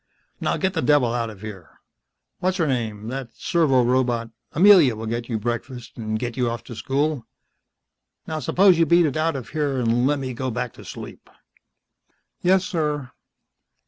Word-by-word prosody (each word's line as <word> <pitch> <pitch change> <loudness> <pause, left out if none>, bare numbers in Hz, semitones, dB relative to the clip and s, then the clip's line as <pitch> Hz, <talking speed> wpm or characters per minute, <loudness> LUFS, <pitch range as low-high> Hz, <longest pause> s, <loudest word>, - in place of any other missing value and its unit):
Now - - 0
get 190 -1 0
the - - -1
devil 140 -6 +3
out 115 -2 -1
of 105 -3 -12
here. 100 -6 -10 0.6
What's 185 +1 0
her 165 - +1
name 110 -6 -2
that 130 -1 -5
servorobot 125 -7 +1 0.2
Amelia 175 - +6
will 110 +1 -6
get 115 +2 -3
your 115 - -1
breakfast 120 +2 -5
and 110 -2 -3
get 120 0 -4
you 125 -2 0
off 115 0 -5
to 120 - -9
school. 140 +2 -1 1.0
Now 155 -1 -3
suppose 180 +5 +4
you 165 - +4
beat 170 +2 +5
it 145 - -1
out 160 0 0
of 130 -3 -6
here 145 -3 -1
and 120 +1 +2
let 145 +1 +2
me 130 -2 -4
go 130 +2 -3
back 125 0 -3
to - - -13
sleep." - - -10 1.1
"Yes, 185 +1 +3
Sir." 150 -8 -2
130 Hz, 175 wpm, -23 LUFS, 115-155 Hz, 1.1 s, Amelia